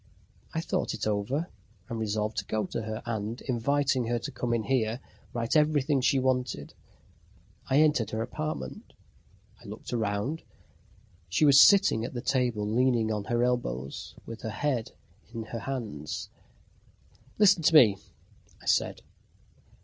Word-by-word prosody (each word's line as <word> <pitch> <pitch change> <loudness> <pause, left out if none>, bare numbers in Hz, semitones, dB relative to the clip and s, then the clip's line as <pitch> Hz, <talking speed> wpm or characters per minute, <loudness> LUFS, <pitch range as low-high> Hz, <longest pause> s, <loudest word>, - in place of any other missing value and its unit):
I - - -2
thought - - -2
it - - -4
over, 110 +10 -1 0.4
and 115 - -4
resolved 110 0 -2
to - - -1
go 110 -1 -1
to - - -4
her, 110 0 -5
and, 110 0 -3
inviting 130 0 0
her 120 +1 0
to 115 - -5
come 120 - -3
in 115 -2 +1
here, 120 -2 0 0.3
write 115 +2 -2
everything 150 -2 +3
she 135 - +3
wanted. 125 - -1 1.0
I 135 +3 +5
entered 150 -9 +2
her 110 +1 -2
apartment. 155 - -5 0.7
I - - -16
looked - - -8
round. 110 +7 -1 0.9
She 95 - +3
was 140 -1 +7
sitting 195 - +6
at 120 - -5
the 120 - -3
table, 120 -6 0
leaning 115 0 +2
on 105 -2 -2
her 120 +1 +1
elbows, 70 - -2
with 115 0 -8
her 115 - -4
head 125 0 -2 0.4
in 115 - -3
her 115 +1 -6
hands. 110 - -5 1.1
"Listen 200 -4 +5
to 160 +1 +3
me," 110 -10 +7 0.6
I - - -17
said. - - +1
120 Hz, 150 wpm, -28 LUFS, 110-135 Hz, 1.1 s, was